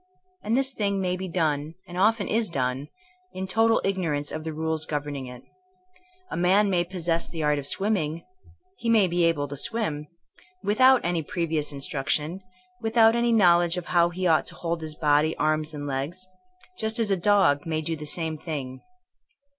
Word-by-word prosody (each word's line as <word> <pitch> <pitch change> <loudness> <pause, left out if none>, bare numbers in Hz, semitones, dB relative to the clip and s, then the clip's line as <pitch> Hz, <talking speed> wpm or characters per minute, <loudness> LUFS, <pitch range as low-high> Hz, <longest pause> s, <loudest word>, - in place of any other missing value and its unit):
And 225 +4 +1
this 270 0 +2
thing 200 -5 -1
may 180 -1 0
be 190 +1 -5
done, 155 -3 -1
and 175 - -9
often 210 +3 +2
is 225 -1 0
done, 130 -2 -2 0.5
in 190 0 -4
total 225 +4 +3
ignorance 165 -7 -1
of 155 - -5
the 160 - -4
rules 160 0 -2
governing 145 -3 -4
it. 125 0 -10 0.9
A - - -3
man 195 +4 +3
may 175 -2 +2
possess 170 -2 -2
the 160 -2 -5
art 150 -1 +2
of 140 - -5
swimming 170 -5 -1 0.3
— 370 -3 -27
^he 230 - 0
may 220 -4 +5
be 175 0 +1
able 150 -4 +1
to 145 - -7
swim 150 -3 -1 0.3
— 365 +1 -29
without 255 +4 +4
any 175 -1 0
previous 160 -2 -2
instruction, 150 +5 -2 0.4
without 225 0 +4
any 235 0 +2
knowledge 175 -5 +4
of 180 - -4
how 170 -1 +4
he 185 +2 -4
ought 160 -3 +3
to - - -6
hold 170 -1 -3
his 155 -1 -5
body, 150 +1 +2
arms 155 0 0
and 145 -2 -6
legs; 145 +7 -4 0.5
just 220 +1 -1
as 225 -3 +1
a - - +4
dog 180 -5 +3
may 160 -1 -1
do 160 +1 -2
the 150 -1 -7
same 160 0 -2
thing. 135 -6 -5
170 Hz, 185 wpm, -25 LUFS, 150-200 Hz, 0.9 s, may